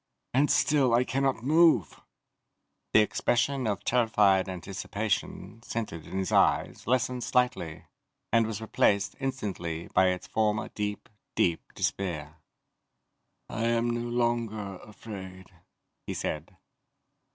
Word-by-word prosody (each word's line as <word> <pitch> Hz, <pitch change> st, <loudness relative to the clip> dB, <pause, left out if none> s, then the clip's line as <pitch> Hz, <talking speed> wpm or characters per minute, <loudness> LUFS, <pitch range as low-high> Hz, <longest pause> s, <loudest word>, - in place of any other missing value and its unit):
And 140 Hz, +4 st, +3 dB
still 135 Hz, -5 st, +3 dB
I 120 Hz, -, +4 dB
cannot 135 Hz, -3 st, 0 dB
move!" 155 Hz, -, +4 dB, 0.9 s
The 110 Hz, -, +7 dB
expression 125 Hz, +4 st, +1 dB
of 105 Hz, -3 st, -2 dB
terrified 105 Hz, -6 st, +3 dB
anticipation, 105 Hz, -, -3 dB
centered 110 Hz, -9 st, -5 dB
in -, -, -5 dB
his 95 Hz, -2 st, -1 dB
eyes, -, -, +2 dB
lessened 125 Hz, 0 st, +1 dB
slightly, 125 Hz, -11 st, 0 dB, 0.5 s
and 115 Hz, -1 st, +4 dB
was 110 Hz, -1 st, -4 dB
replaced, 100 Hz, -2 st, +1 dB
instantly, 100 Hz, -, -4 dB
by 95 Hz, -, +5 dB
its 90 Hz, -1 st, -1 dB
former 105 Hz, -1 st, 0 dB
deep, 105 Hz, -1 st, -4 dB, 0.3 s
deep 85 Hz, -2 st, 0 dB
despair. 80 Hz, -5 st, -3 dB, 1.1 s
"I 115 Hz, -, -3 dB
am 115 Hz, 0 st, +1 dB
no 120 Hz, 0 st, -2 dB
longer 115 Hz, -5 st, -1 dB
afraid," 95 Hz, -4 st, -10 dB, 0.6 s
he -, -, -3 dB
said. 80 Hz, +4 st, -4 dB
110 Hz, 115 wpm, -28 LUFS, 95-120 Hz, 1.1 s, The